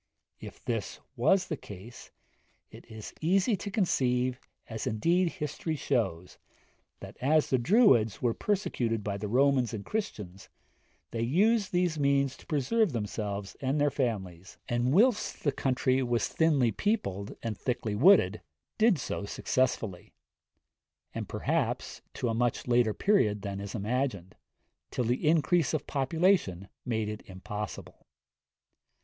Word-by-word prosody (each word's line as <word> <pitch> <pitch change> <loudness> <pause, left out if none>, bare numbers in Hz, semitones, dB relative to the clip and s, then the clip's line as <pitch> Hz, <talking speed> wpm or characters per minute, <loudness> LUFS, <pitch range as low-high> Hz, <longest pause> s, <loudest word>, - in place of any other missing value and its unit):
If - - -11
this - - -3 0.2
was 190 -1 +3
the 170 - -3
case, 105 +3 -11 0.6
it - - -14
is 110 -1 -9
easy 195 +7 +2
to 200 - -5
conceive, 130 - +1 0.3
as 110 -1 -5
indeed 170 +11 +1
history 155 -1 -3
shows, 95 - -2 0.6
that, - - -10
as 150 +4 +2
the 130 - +3
Druids 120 - +4
were 120 -2 +1
persecuted 120 - -1
by 100 -1 -2
the 105 +1 -4
Romans 130 0 +2
and 100 - -7
Christians, 105 - -5 0.6
they 115 - -3
used 200 - +2
these 175 -3 +1
means 140 -1 +2
to - - -18
preserve 165 - +1
themselves 105 -2 -4
and 135 +2 0
their 145 0 +3
families, 100 - -3
and 120 +1 0
whilst 210 - +2
the 145 - +2
country 130 -1 +1
was 120 -3 0
thinly 145 -8 +2
peopled, 100 - -2
and 115 -2 -2
thickly 115 -2 -2
wooded, 110 - +5 0.4
did 220 -4 +5
so 115 -6 -4
successfully; 110 -5 -2 1.0
and, - - -5
perhaps, - - -2
to - - -2
a 115 - 0
much 120 +1 0
later 120 -3 +3
period 105 - +2
than 100 -1 -4
is 100 +2 -6
imagined: 110 -4 -2 0.6
till 125 - -2
the 125 +6 +1
increase 165 0 +2
of 155 - -3
population 140 - +1 0.2
made 110 -3 -1
it 105 0 -5
impossible. 105 0 -7
125 Hz, 135 wpm, -29 LUFS, 105-160 Hz, 1.0 s, wooded